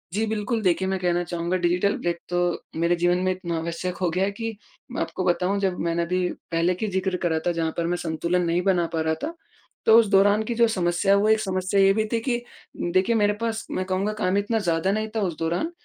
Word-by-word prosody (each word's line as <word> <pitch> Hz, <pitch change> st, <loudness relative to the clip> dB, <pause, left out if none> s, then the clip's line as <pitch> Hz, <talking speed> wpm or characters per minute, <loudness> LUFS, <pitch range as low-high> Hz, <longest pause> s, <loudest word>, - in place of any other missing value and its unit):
जी, 215 Hz, +3 st, +1 dB
बिल्कुल 220 Hz, +1 st, -1 dB
देखिए, 190 Hz, -1 st, +1 dB
मैं 190 Hz, 0 st, 0 dB
कहना 175 Hz, -1 st, +1 dB
चाहूँगा 175 Hz, +1 st, -2 dB
डिजिटल 180 Hz, +3 st, +1 dB
ब्रेक 175 Hz, 0 st, -2 dB
तो 175 Hz, -, -1 dB, 0.4 s
मेरे 170 Hz, +1 st, +2 dB
जीवन 175 Hz, +1 st, +2 dB
में 185 Hz, -, +2 dB
इतना 175 Hz, -2 st, -3 dB
आवश्यक 170 Hz, +2 st, -4 dB
हो 180 Hz, -2 st, 0 dB
गया 180 Hz, +3 st, 0 dB
है 200 Hz, -, -1 dB
कि 225 Hz, +2 st, -5 dB, 0.4 s
मैं -, -, -3 dB
आपको 185 Hz, -, -3 dB
बताऊँ 180 Hz, +3 st, +1 dB
जब 190 Hz, -2 st, 0 dB
मैंने 170 Hz, 0 st, 0 dB
अभी 180 Hz, +1 st, 0 dB, 0.2 s
पहले 165 Hz, +2 st, +2 dB
की 215 Hz, +5 st, -3 dB
ज़िक्र 190 Hz, -1 st, -1 dB
करा 170 Hz, -3 st, 0 dB
था 175 Hz, -, +2 dB
जहाँ 165 Hz, -1 st, -1 dB
पर 170 Hz, -, 0 dB
मैं 175 Hz, +1 st, 0 dB
संतुलन 170 Hz, +1 st, -1 dB
नहीं 170 Hz, +1 st, +1 dB
बना 180 Hz, -2 st, +2 dB
पा 160 Hz, -, 0 dB
रहा 160 Hz, 0 st, +1 dB
था, 325 Hz, -, -3 dB, 0.5 s
तो 225 Hz, -, +7 dB
उस 230 Hz, -, +3 dB
दौरान 200 Hz, +2 st, +4 dB
की 235 Hz, +2 st, -3 dB
जो 235 Hz, 0 st, +4 dB
समस्या 185 Hz, -1 st, +1 dB
है -, -, +5 dB
वो 215 Hz, -, +2 dB
एक 220 Hz, 0 st, +4 dB
समस्या 190 Hz, -1 st, 0 dB
ये 195 Hz, 0 st, +5 dB
भी 215 Hz, +1 st, 0 dB
थी 230 Hz, -, +2 dB
कि 240 Hz, -2 st, +2 dB, 0.4 s
उम, 175 Hz, -, -1 dB
देखिए 185 Hz, +6 st, +2 dB
मेरे 210 Hz, -1 st, +3 dB
पास 225 Hz, -1 st, -2 dB
मैं 185 Hz, -, -2 dB
कहूँगा 190 Hz, +3 st, -1 dB
काम 200 Hz, -2 st, 0 dB
इतना 210 Hz, +3 st, 0 dB
ज़्यादा 175 Hz, -1 st, 0 dB
नहीं 215 Hz, +2 st, -1 dB
था 220 Hz, -, 0 dB
उस 175 Hz, -5 st, -2 dB
दौरान। 170 Hz, -, -1 dB
185 Hz, 245 wpm, -24 LUFS, 175-205 Hz, 0.5 s, तो